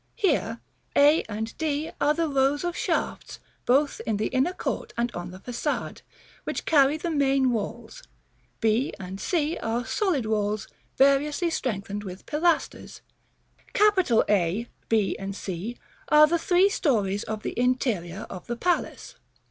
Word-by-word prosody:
Here 395 - 0 0.3
a 295 +3 +6
and 220 +2 -4
d 310 -1 -1
are 300 - +3
the 335 0 0
rows 275 +1 +1
of 350 0 -2
shafts, - - -2 0.3
both 280 +3 +2
in 220 -2 +1
the 215 - -1
inner 265 +7 +1
court - - -4
and 235 0 0
on 175 -3 -6
the 185 - -10
Façade, 245 +8 -3 0.4
which - - -4
carry 285 -1 +4
the 335 +2 -3
main 270 -3 +2
walls; 235 - -4 0.6
b, 225 +4 +1 0.2
c 310 - -1
are 235 +2 -2
solid 275 - 0
walls 210 -1 -1 0.3
variously 285 +5 +3
strengthened 205 -7 -3
with 185 -2 -8
pilasters. 330 +3 -1 1.3
A, 200 +3 +1 0.2
B, 215 -3 +2 0.2
C 195 +4 -5 0.3
are 300 0 +8
the 335 +2 +1
three 365 +3 +4
stories 205 - 0
of 215 -1 -5
the - - -3
interior 230 -7 0
of 180 - -9
the 240 - -2
palace. 360 - -2
255 Hz, 140 wpm, -26 LUFS, 215-300 Hz, 1.3 s, are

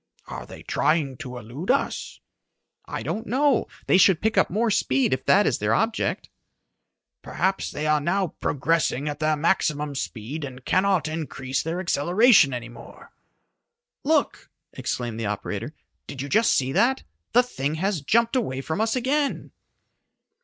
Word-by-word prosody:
"Are - - -8
they - - -11
trying 150 -4 0
to 125 0 -7
elude 125 - -8
us?" 275 +2 -1 0.7
"I - - -5
don't 225 +2 -4
know. 275 0 +2 0.2
They 185 - +4
should 190 -4 +5
pick 220 +1 0
up - - +3
more 220 +5 +1
speed 130 -8 +2
if 130 0 -2
that 205 +2 +5
is - - +1
their - - +1
object." 225 0 -1 0.9
"Perhaps 190 +1 -1
they 150 - -4
are 155 -1 +2
now 185 +4 0
progressing 150 -1 0
at 145 0 -4
their 155 0 +2
maximum 150 -2 0
speed 135 +3 -5
and 130 -2 -8
cannot 185 -3 +2
increase 140 -4 -3
their 165 +3 -3
acceleration 180 - +4
any 120 -2 -4
more." 120 - -14 0.9
"Look!" - - 0 0.2
exclaimed 120 -2 -4
the 110 - -2
operator. 105 0 -4 0.3
"Did 135 - -8
you 140 - -6
just 220 +6 +3
see 130 0 +1
that? 240 - +2 0.3
The 245 +2 +6
thing 145 - -3
has 185 0 -1
jumped 230 - +2
away 135 - -1
from 160 +8 -3
us 220 +1 +1
again!" 275 +3 -1
160 Hz, 155 wpm, -24 LUFS, 135-215 Hz, 0.9 s, The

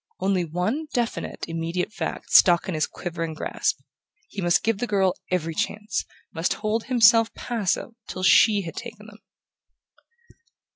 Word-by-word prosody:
Only 190 -2 +1
one 185 - -2
definite 240 -2 -2
immediate 165 +4 -3
fact - - -5
stuck 175 -2 +6
in 185 - -2
his 155 -1 0
quivering 165 -2 -5
grasp. - - -2 0.5
He 200 - -6
must 175 0 +2
give 225 -3 0
the 245 - -2
girl 195 -3 +2 0.2
every 165 -3 -1
chance 210 +6 -2 0.3
must 165 -1 0
hold 220 +1 -2
himself 230 -2 +5
passive 230 -2 -2 0.2
till 185 - -6
she 205 +2 +5
had 165 -3 -7
taken 225 -3 -8
them... 215 -1 -14
195 Hz, 145 wpm, -24 LUFS, 175-225 Hz, 0.5 s, stuck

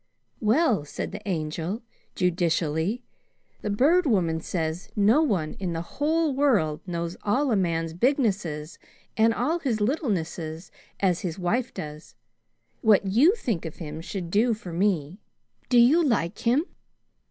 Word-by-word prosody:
"Well," 225 - +2
said 145 - -5
the 205 - -7
Angel 165 +6 -3 0.3
judicially, 175 +4 0 0.6
"the 210 - -3
Bird 300 - +3
Woman 170 -8 +1
says 165 +3 -3
no 215 +8 +4
one 185 - 0
in 180 -3 -2
the 165 0 -3 0.2
whole 315 0 +2
world 215 - +2
knows 170 0 -3
all 255 +6 +1
a - - +3
man's 165 -4 0
bignesses 190 - 0 0.4
and 225 +1 +4
all 320 +9 0
his 245 -8 -1
littlenesses 180 - -2 0.3
as 185 -3 +2
his 175 -3 -4
wife 230 +8 0
does. 150 0 -8 0.7
What 210 -3 +4
you 255 - +4
think 230 - -2
of 160 -2 -6
him 155 -1 -7
should 175 -1 -5
do 225 +4 +3
for 180 -5 -9
me. 180 -1 0 0.5
Do 245 - +4
you 270 +9 +6
like 210 - 0
him?" 255 +7 +2
195 Hz, 140 wpm, -26 LUFS, 165-245 Hz, 0.7 s, you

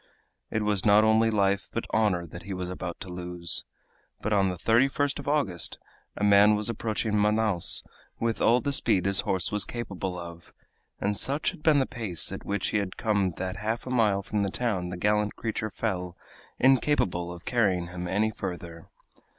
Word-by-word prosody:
It 110 - -1
was 105 -2 +1
not 105 0 +6
only 110 +1 +4
life, 100 -2 +1
but - - -3
honor 100 -6 +1
that 85 +2 -10
he 95 +1 -6
was 90 -1 -4
about 90 -1 -5
to - - -6
lose. 90 -1 -3 0.5
But 110 - -1
on 95 -2 +3
the 90 - -3
31st 135 - +2
of 140 - -8
August 140 - 0 0.4
a - - -3
man 105 +1 +6
was 105 +2 -2
approaching 110 -1 -2
Manaos 105 -3 +1 0.4
with 115 -1 -1
all 120 +2 +4
the 140 - -1
speed 105 -8 +2
his 100 -1 +5
horse 95 -2 0
was 105 -1 +3
capable 95 -6 -4
of, 85 -1 -10 0.5
and 105 +1 0
such 140 +8 0
had - - -14
been 155 -2 +4
the 135 - +3
pace 110 - -1
at - - -6
which 100 -1 -2
he - - 0
had 100 -2 -3
come 100 -5 +1
that 95 0 -4
half 110 +4 -3
a 130 - -5
mile 105 -5 +2
from 105 +2 -2
the 100 -1 +1
town 95 -5 -1
the 90 - -5
gallant 105 +2 +1
creature 110 -1 -3
fell, 90 -4 -3 0.4
incapable 125 -10 +2
of 85 -1 -10
carrying 95 -8 +1
him 90 0 -5
any 105 +4 +1
further. 85 -5 -7
105 Hz, 190 wpm, -27 LUFS, 90-110 Hz, 0.5 s, not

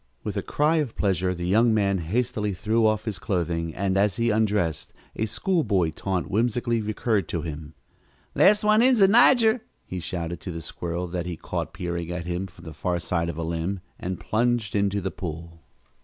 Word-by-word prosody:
With - - -4
a - - 0
cry 155 +3 +1
of 145 -7 -1
pleasure 95 -2 0
the 85 0 -4
young 110 +5 +4
man 100 -2 +2
hastily 105 +2 -1
threw 110 +3 +2
off 110 0 0
his 105 -6 -3
clothing, 85 -4 -2
and, 95 0 0
as 100 -1 +2
he 115 0 +1
undressed, 105 -7 0 0.2
a 110 - -1
school 160 - 0
boy 95 - +1
taunt 95 +1 -2
whimsically 120 +2 0
recurred 105 -2 0
to 85 - -2
him. 80 -1 -7 0.6
"Last 210 +2 +5
one 215 +1 +5
in's 250 -1 +4
a 195 - +8
nigger!" 230 +1 +5 0.2
he 90 - -5
shouted 85 0 -4
to 95 - -5
the 85 -1 -5
squirrel 85 +2 -4
that 90 0 -3
he 85 -2 -4
caught - - -4
peering 85 -1 -4
at 90 -1 -4
him 90 +2 -2
from 95 - -17
the 80 - -7
far 90 +1 -1
side 85 0 -1
of 85 - -5
a 85 - -2
limb, 85 +4 -2 0.2
and 90 0 -4
plunged 115 -2 0
into 100 0 +1
the 95 0 -3
pool. 85 -1 -7
95 Hz, 200 wpm, -25 LUFS, 85-115 Hz, 0.6 s, a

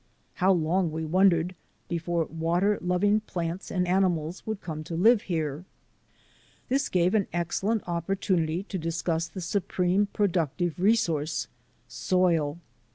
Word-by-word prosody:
How 190 +1 +5
long, 175 0 +1
we 160 +1 -3
wondered, 180 0 +3 0.3
before 170 -1 -1
water 170 +6 0
loving 180 +4 +2
plants 175 -3 -4
and 180 -1 0
ani 190 +2 +4
mals 165 0 -3
would 220 -2 -2
come 155 -4 -6
to 165 - -5
live 215 +6 +5
here. 155 -2 -2 1.1
This 270 +2 +1
gave 180 0 +2
an 210 -3 +2
excellent 190 +6 -1
opportunity 175 -1 -1
to 195 -2 -5
discuss 165 0 -1
the 185 +3 -8
supreme 185 +2 0
productive 175 -4 -1
resource 165 -7 +1 0.3
— - - -39
soil. 170 -6 +1
175 Hz, 135 wpm, -27 LUFS, 165-190 Hz, 1.1 s, How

